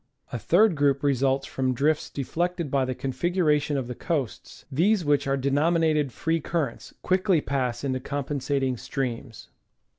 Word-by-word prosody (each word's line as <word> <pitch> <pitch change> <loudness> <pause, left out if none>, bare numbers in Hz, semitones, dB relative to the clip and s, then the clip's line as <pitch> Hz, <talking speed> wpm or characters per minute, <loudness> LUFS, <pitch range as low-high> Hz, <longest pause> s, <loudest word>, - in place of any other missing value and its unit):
A 120 - -2
third 195 - +4
group 140 -1 +2
results 135 0 +2
from 130 -1 -1
drifts 150 +4 +1
deflected 170 +2 -2
by 135 -2 +2
the 130 0 -3
config 135 +8 -2
xiration 150 -4 +2
of 130 -3 -3
the 125 - -4
coasts; 140 -2 -4
these 180 +6 +2
which 145 -1 +2
are 135 0 +1
denominated 150 +1 +2
free 165 +7 -1
cur 160 -3 -1
rents, - - -14
quickly 185 -1 +2
pass 130 -4 -2
into 130 -2 -1
compensating 140 -1 -2
streams. 120 -2 -5
140 Hz, 155 wpm, -26 LUFS, 130-160 Hz, -, third